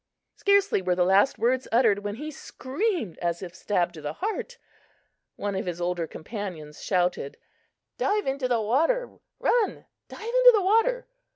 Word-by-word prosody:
Scarcely 400 - +3
were 180 -1 +1
the 180 0 +2
last 195 +7 +4
words 250 +3 +1
uttered 225 -4 +4
when 205 0 -4
he 300 +6 -6
screamed 285 - -3
as 170 +1 -2
if 175 -2 -7
stabbed 180 -2 -1
to 160 - -10
the 150 0 -4
heart. 440 - -4 0.8
One 205 0 -3
of 190 0 -3
his 175 -1 -3
older 175 -1 -1
companions 160 -5 -7
shouted: 180 -6 0 0.6
"Dive 415 +1 +1
into 270 -1 -1
the 240 -2 +1
water! 325 - 0 0.2
Run! 470 -4 +1 0.2
Dive - - -10
into - - +7
the 410 - +2
water!" 455 +6 +2
225 Hz, 160 wpm, -26 LUFS, -, 0.8 s, into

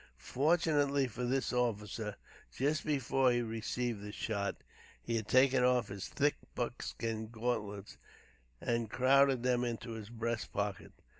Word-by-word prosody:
Fortunately 145 -2 +2
for 125 0 -4
this 130 +1 0
officer, 110 -3 -1 0.4
just 145 +4 +1
before 135 -3 +2
he 120 0 +1
received 115 0 -2
the 105 0 -6
shot, 100 -2 -2 0.4
he 115 - -3
had 110 -2 -2
taken 130 0 +5
off 125 -3 +3
his 100 -1 -5
thick 145 +1 +1 0.2
buckskin 110 -1 -3
gauntlets 110 -3 -3 0.6
and 115 -2 -1
crowded 135 +1 +4
them 125 -1 +2
into 115 -1 -3
a 110 - -5
breast 115 0 -3
pocket. 100 -1 -3
120 Hz, 135 wpm, -34 LUFS, 110-130 Hz, 0.6 s, taken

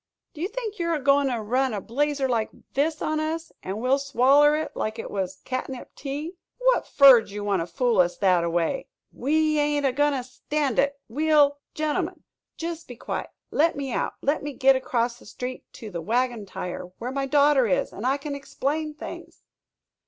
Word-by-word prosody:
"Do 310 - -9
you 360 - 0
think 440 -2 -5
you're 335 -1 +1
a - - -2
goin' 280 0 +3
to 245 -3 -1
run 250 +3 0
a - - -2
blazer 275 +6 0
like 230 -3 0 0.2
this 300 +3 0
on 310 0 0
us, 320 +1 -3
and 195 +3 -4
we'll 255 +4 +2
swaller 280 +2 +4
hit 310 - -4
like 220 +1 -2
hit - - -6
was 190 -1 -4
catnip 255 0 -5
tea?" 295 +6 -5 0.2
"What - - +2
fer 275 -4 +8
did - - -14
ye 205 +1 -6
want 200 -2 0
to 165 - -3
fool 230 +6 +1
us 175 -1 +3
thataway?" 175 +4 +1 0.3
"We 305 +3 +1
ain't 290 -1 +1
a 270 - +3
goin' 290 +3 +2
to 260 -2 -2
stand 260 +1 -2
it 280 0 +1
we'll 290 +2 +3
" - - -61
"Gentlemen, 305 -1 -2 0.3
jest 335 0 -5
be 245 - -9
quiet. - - -4 0.2
Let 325 +3 +3
me 275 -3 -4
out - - -1
let 290 +3 +1
me 290 0 -5
git 270 0 +5
across 245 -2 -1
the - - -17
street 250 +3 -7
to 220 -4 -9
the 170 -2 -4
Wagon 235 +2 -1
Tire 180 -1 -5
where 245 +2 -4
my 275 0 -2
daughter 285 -2 +4
is 185 - 0
and 205 - -7
I 265 +3 +2
can 285 +1 -5
explain 295 +2 -3
things." - - -9
275 Hz, 200 wpm, -25 LUFS, 235-295 Hz, 0.3 s, fer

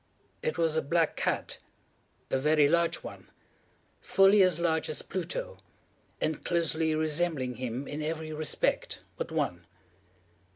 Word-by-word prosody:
It 155 - -2
was 165 -2 +2
a 160 - +2
black 165 +1 +1
cat—a 135 - -4
very 150 +1 +4
large 170 +2 +1
one—fully 195 +1 0
as 180 -3 +4
large 160 -2 +1
as 150 - -2
Pluto, - - -4 0.6
and 155 -2 -2
closely 160 -2 +1
resembling 155 -5 0
him 125 +2 -4
in 150 +1 -4
every 155 0 -3
respect 155 -1 -1
but - - -5
one. 90 -1 -2
160 Hz, 120 wpm, -29 LUFS, 150-170 Hz, 0.6 s, very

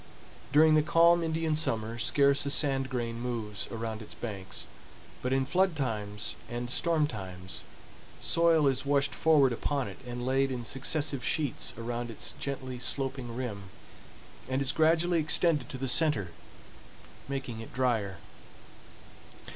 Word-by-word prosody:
During 155 +1 +6
the 155 - +6
calm 170 +2 +5
Indian 160 -1 0
summer, 115 -6 -1
scarce 140 +3 +3
a - - +1
sand 135 -2 +1
grain 115 -2 -3
moves 115 -4 -3
around 115 -1 -4
its 110 - -10
banks, 100 -5 -5 0.6
but 125 - -2
in 135 0 +2
flood 180 +4 +2
times 105 -7 -3
and 120 +1 -4
storm 165 +1 +2
times, 95 -7 -6 0.6
soil 165 -2 +3
is 135 -2 +2
washed 140 0 +1
forward 145 -6 +4
upon 140 +2 -1
it 95 - -9
and 120 0 -5
laid 135 +1 +2
in 125 -2 -4
successive 140 +2 -1
sheets 145 -6 0
around 120 +1 -4
its 115 - -2
gently 130 -2 -4
sloping 130 -2 -2
rim, 110 -6 -4 0.8
and 130 +1 0
is 135 0 +3
gradually 165 +3 +3
extended 155 -3 +2
to 130 - -5
the 135 +1 -3
center, 130 - +2 1.0
making 135 -5 -4
it 115 - -9
dryer. 115 -6 0
130 Hz, 140 wpm, -30 LUFS, 115-150 Hz, 1.0 s, During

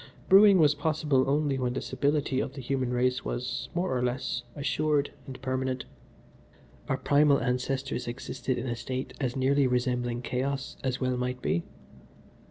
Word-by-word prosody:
"Brewing 195 0 +8
was 150 -4 +5
possible 150 -3 +1
only 145 -1 +1
when 125 -1 0
the - - -2
stability 145 -2 0
of 135 - -2
the 135 - -7
human 130 0 -1
race 125 +1 +1
was, 125 0 -3
more 180 -5 0
or 125 - 0
less, 125 +1 -1
assured 145 +1 0 0.2
and 130 -1 -8
permanent. 130 0 -2 1.0
Our 135 - +1
primal 145 +2 +4
ancestors 125 0 -2
existed 125 +1 -3
in - - -3
a 120 -2 -2
state 130 +2 -4
as 125 -3 -1
nearly 135 +1 +3
resembling 125 -1 0
chaos 135 +2 -2
as 130 -1 -1
well 130 -1 0
might 125 0 -2
be. 85 - +1
130 Hz, 160 wpm, -28 LUFS, 125-140 Hz, 1.0 s, Brewing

